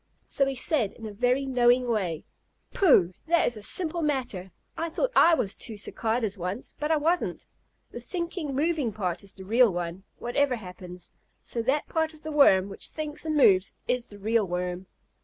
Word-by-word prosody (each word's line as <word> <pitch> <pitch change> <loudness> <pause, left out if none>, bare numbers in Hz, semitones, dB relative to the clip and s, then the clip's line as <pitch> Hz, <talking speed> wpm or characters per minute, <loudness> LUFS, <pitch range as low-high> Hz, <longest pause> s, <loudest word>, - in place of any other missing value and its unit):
So 275 - 0
he 270 - -2
said 250 -4 0
in 225 - -11
a 215 - -6
very 250 +5 +1
knowing 250 -1 +3
way: 185 -9 -1 0.5
"Pooh! 190 - +4
That 340 +1 +3
is 240 - +2
a 215 - -8
simple 340 - +1
matter. 245 - -2 0.3
I 330 +1 -3
thought - - -1
I 335 0 +7
was 200 -10 -1
two 220 -3 -5
Cicadas 220 -1 -2
once, 180 +7 -5
but 300 +1 -2
I 315 - +4
wasn't. 330 +4 0 0.5
The - - -7
thinking, 340 -5 -4
moving 300 -4 0
part 185 -4 -3
is 200 - -12
the 190 - -11
real 230 +2 +4
one, 175 +1 -4
whatever 260 +2 0
happens, 180 -4 -10 0.3
so 235 - -3
that 265 +6 0
part 320 -1 -1
of 310 - -20
the 310 - -5
Worm 200 -11 +5
which 195 - -6
thinks 305 0 -5
and 310 -1 0
moves 190 -8 +4
is 245 -1 -1
the 205 - -12
real 215 +1 +1
Worm." 180 +1 -3
240 Hz, 190 wpm, -27 LUFS, 195-300 Hz, 0.5 s, I